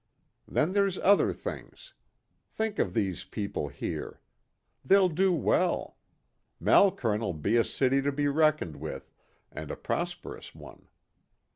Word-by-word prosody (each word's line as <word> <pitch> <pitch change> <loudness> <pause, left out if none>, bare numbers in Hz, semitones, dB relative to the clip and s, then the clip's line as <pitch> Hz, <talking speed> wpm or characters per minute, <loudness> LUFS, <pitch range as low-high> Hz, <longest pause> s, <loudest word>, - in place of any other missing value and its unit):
Then 160 +5 0
there's 200 -2 +2
other 200 +2 +4
things. - - -8 0.6
Think 220 -1 -3
of 90 - 0
these 95 -6 -1
people 100 -8 -4
here. - - -6 0.6
They'll 190 +5 +5
do 185 +4 +2
well. 165 -7 +1 0.6
Malkern'll 115 - +3
be 85 +8 0
a 115 - +5
city 135 +3 +1
to 140 +1 0
be 145 +1 0
reckoned 155 - +1
with, 70 -2 -7 0.4
and 75 0 -7
a - - -4
prosperous - - -5
one. - - -14
140 Hz, 125 wpm, -29 LUFS, -, 0.6 s, They'll